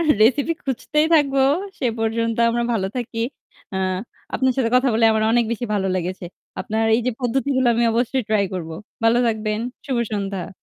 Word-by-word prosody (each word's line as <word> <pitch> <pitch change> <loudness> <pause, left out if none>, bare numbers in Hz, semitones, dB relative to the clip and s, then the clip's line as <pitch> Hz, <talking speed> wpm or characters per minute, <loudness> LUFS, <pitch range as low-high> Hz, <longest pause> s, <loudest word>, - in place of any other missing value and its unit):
এহ 325 - 0
রেসিপি 280 +8 +3
খুঁজতেই 300 +4 0
থাকবো। 275 -3 +3 0.4
সে 255 - 0
পর্যন্ত 230 0 0
আমরা 235 0 0
ভালো 195 -4 0
থাকি। 240 -1 -4 0.6
আ - - -1 0.6
আপনার 260 -1 +2
সাথে 235 -4 +1
কথা 255 +1 +3
বলে 225 - +3
আমার 220 0 +1
অনেক 235 0 +3
বেশি 240 +1 -3
ভালো 195 -1 0
লেগেছে। 180 +1 -4 0.4
আপনার 220 +1 -1
এইযে 245 +1 0
পদ্ধতিগুলো 260 +1 0
আমি 235 - +2
অবশ্যই 245 +2 0
ট্রাই 210 -2 +2
করবো। 165 -3 -5 0.3
ভালো 230 +1 +4
থাকবেন। 215 -1 -1 0.3
শুভ 265 - -1 0.2
সন্ধ্যা। 195 -3 -3
230 Hz, 170 wpm, -21 LUFS, 215-260 Hz, 0.6 s, ভালো